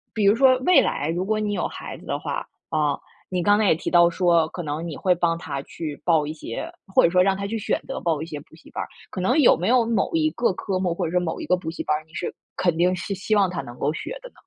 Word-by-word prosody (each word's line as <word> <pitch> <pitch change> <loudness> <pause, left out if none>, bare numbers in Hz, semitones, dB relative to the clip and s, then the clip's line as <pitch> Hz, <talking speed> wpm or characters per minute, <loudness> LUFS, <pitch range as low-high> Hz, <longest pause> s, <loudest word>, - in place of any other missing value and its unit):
比 215 - 0
如 205 +3 +6
说 260 0 +5
未 365 - +7
来 145 +3 -1
如 175 +3 -1
果 215 +1 0
你 210 -1 -1
有 - - -1
孩 - - -8
子 - - -15
的 - - -2
话， - - -4 0.2
啊， 150 -2 +1 0.3
你 180 -2 -1
刚 205 0 +5
才 215 - +3
也 - - +5
提 - - -4
到 170 -1 +6
说， 170 -2 +3
可 175 - -6
能 155 +3 -3
你 155 - -5
会 185 -1 +2
帮 170 -1 0
他 140 -5 -5
去 155 -3 -7
报 160 -4 +3
一 150 - -4
些 320 - -6 0.2
或 - - +6
者 170 - +5
说 180 +1 +4
让 190 +1 +3
他 200 +1 -4
去 220 +2 -3
选 - - -1
择 - - -4
报 160 -3 0
一 - - -3
些 150 -3 -6
补 160 - -17
习 160 - -18
班 - - -4
儿。 - - -5 0.2
可 - - -6
能 245 +11 +2
有 290 - +6
没 180 - -2
有 245 -1 +4
某 230 0 +1
一 310 -1 +3
个 235 -8 0
科 185 0 -3
目， 180 -2 0
或 180 - -1
者 160 - -3
说 180 - +2
某 165 -2 -3
一 - - -4
个 180 - +2
补 160 -3 -5
习 165 - -5
班 150 - +1
儿， 155 - -10
你 160 - -26
是 175 - -4 0.2
肯 175 -3 +1
定 180 +2 +3
是 180 +3 -4
希 205 +3 -1
望 195 -3 +3
他 180 - -3
能 120 0 -11
够 145 - 0
学 - - -6
的 - - -10
呢？ - - -36
180 Hz, 330 characters per minute, -24 LUFS, 160-205 Hz, 0.3 s, 未